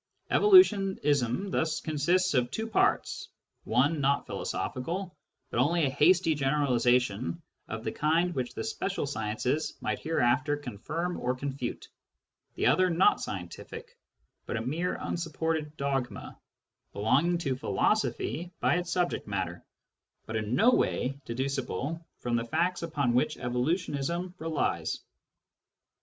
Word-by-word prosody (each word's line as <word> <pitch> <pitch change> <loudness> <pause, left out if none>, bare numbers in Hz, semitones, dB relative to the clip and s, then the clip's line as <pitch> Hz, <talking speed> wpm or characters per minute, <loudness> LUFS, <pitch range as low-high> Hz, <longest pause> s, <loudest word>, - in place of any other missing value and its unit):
Evolutionism 195 - +4
thus 160 -3 0
consists 170 +5 +1
of 125 -2 +2
two 220 - -3
parts: 225 - +1 0.4
one 140 +6 +2
not 140 +1 +2
philo - - -5
sophical, 175 +8 -3 0.4
but - - -1
only 160 +5 +3
a 135 - 0
hasty 165 +4 +4
generalisation 125 -3 +1 0.3
of 115 0 -5
the - - -2
kind 165 +4 +1
which 130 -4 -3
the 110 - -3
special 195 - -2
sciences 125 +3 -2
might - - -2
hereafter 145 -1 +1
confirm 145 - -4
or 125 +1 0
confute; 135 -2 -4 0.7
the - - -1
other 185 0 +4
not 180 - +4
scientific, 475 +2 -7 0.5
but - - -2
a - - -2
mere 165 +7 -1
unsupported 160 -2 -3
dogma, 135 -3 -2 0.6
belonging 140 +12 +2
to 140 -6 -1
philosophy 165 +5 0
by - - +3
its 175 -1 -3
subject 175 -1 0
matter, 95 -4 -3 0.6
but 110 - -5
in 110 +2 -1
no 235 +4 +5
way 135 - +1
deducible 135 - -3
from 120 -1 -2
the 115 0 0
facts 175 +9 0
upon 145 -7 0
which 150 +5 +1
evolution 155 +6 -1
relies. 160 -1 -1
145 Hz, 125 wpm, -29 LUFS, 125-175 Hz, 0.7 s, no